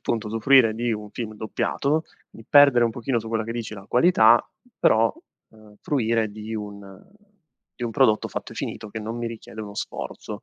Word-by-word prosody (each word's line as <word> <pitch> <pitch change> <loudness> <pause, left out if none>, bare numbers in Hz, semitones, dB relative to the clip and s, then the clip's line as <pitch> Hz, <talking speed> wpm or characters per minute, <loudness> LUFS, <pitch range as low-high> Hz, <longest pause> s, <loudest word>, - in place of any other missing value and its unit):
punto, 115 -2 -2
usufruire 115 +1 +4
di 120 +1 -1
un 105 -1 -6
film 110 -1 -6
doppiato, 140 +8 -1 0.3
di 115 - -14
perdere 140 -4 +6
un 115 - +1
pochino 120 +2 -2
su 110 - -7
quella 115 0 -1
che 115 - -4
dici 115 -2 -5
la 95 - -11
qualità, 120 -5 +5 0.4
però, 110 0 +3 0.4
uhm, 110 -1 -19
fruire 115 -5 0
di 110 +1 -7
un 100 -2 -9 0.7
di 120 - -3
un 115 - -3
prodotto 120 -6 +3
fatto - - -6
e - - -13
finito, - - -5
che 110 - -6
non 110 +2 -5
mi 120 0 -3
richiede 110 -1 -9
uno 100 -1 -8
sforzo. - - -6
115 Hz, 190 wpm, -24 LUFS, 110-120 Hz, 0.7 s, perdere